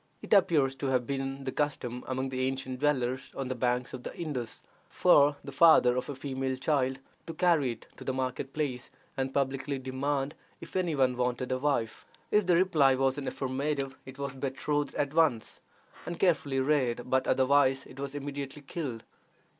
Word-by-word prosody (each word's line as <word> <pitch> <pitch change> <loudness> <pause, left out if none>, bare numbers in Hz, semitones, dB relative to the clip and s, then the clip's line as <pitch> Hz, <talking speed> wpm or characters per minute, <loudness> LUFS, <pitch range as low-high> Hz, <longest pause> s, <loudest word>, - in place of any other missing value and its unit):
It - - -1
appears 160 -9 +4
to 135 - -2
have 130 -2 +1
been 135 +1 -3
the 130 - -3
custom 125 -4 -2
among 130 0 -2
the 130 0 -1
ancient 130 -1 -4
dwellers 130 -3 0
on 135 -2 -3
the - - 0
banks 125 0 -1
of 130 - -6
the - - -6
Indus 135 -9 -4 0.3
for 145 -5 +5
the - - -7
father 155 -7 +6
of 125 - -2
a 145 - -4
female 130 -1 -3
child 130 -1 +1 0.3
to 165 - -6
carry 155 -8 +3
it 115 - -16
to - - -9
the - - -1
market 130 +1 -3
place, 135 -5 -3 0.3
and 135 0 -2
publicly 135 0 -1
demand 135 +2 -2 0.3
if 165 - -11
any 175 -4 +1
one 130 -2 +2
wanted 125 +1 -1
a 130 - 0
wife. 130 -6 -1 0.3
If 210 -3 +3
the 175 - +5
reply 155 -8 +4
was 135 +1 +1
in 140 - -5
the - - -5
affirmative, 135 +1 -2
it 130 0 -11
was 140 -1 -4
betrothed 140 +2 -2
at 145 0 -1
once, 155 -9 +1 0.5
and 175 -1 -5
carefully 145 -7 +2
reared, 130 -4 +1
but 130 0 +1
otherwise 135 0 +3
it 130 - -13
was 140 0 -4
immediately 140 0 -5
killed. 135 -7 -5
135 Hz, 185 wpm, -30 LUFS, 130-145 Hz, 0.5 s, father